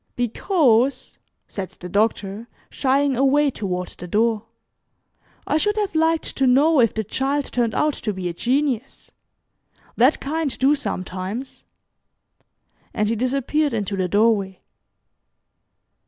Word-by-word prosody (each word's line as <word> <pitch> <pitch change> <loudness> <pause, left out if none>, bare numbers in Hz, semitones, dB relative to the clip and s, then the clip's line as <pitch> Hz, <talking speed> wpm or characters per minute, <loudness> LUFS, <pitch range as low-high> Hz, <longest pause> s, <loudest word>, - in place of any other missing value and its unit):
"Because," 250 - +1 0.3
said 190 -2 -5
the 180 - -7
Doctor, 205 +2 -1 0.2
shying 275 0 +1
away 275 +3 +3
toward 180 -5 -4
the 180 - -9
door, 220 +3 0 1.0
"I - - +1
should 415 +6 0
have 415 -2 -1
liked 320 0 +1
to 270 - +2
know 285 +5 +4
if 230 -3 +3
the 220 - -1
child 275 +6 -1
turned 235 -3 0
out 300 0 +2
to 215 - -3
be 185 -2 -4
a 175 - -3
genius. 260 - -2 0.9
That 255 +6 +4
kind 305 0 -2
do 270 +3 +4
sometimes," 195 -2 -5 1.3
and 210 0 +1
he 230 - 0
disappeared 275 +5 0
into 205 -3 -2
the 185 -1 -1
doorway. 205 -2 +1
245 Hz, 125 wpm, -22 LUFS, 210-285 Hz, 1.3 s, know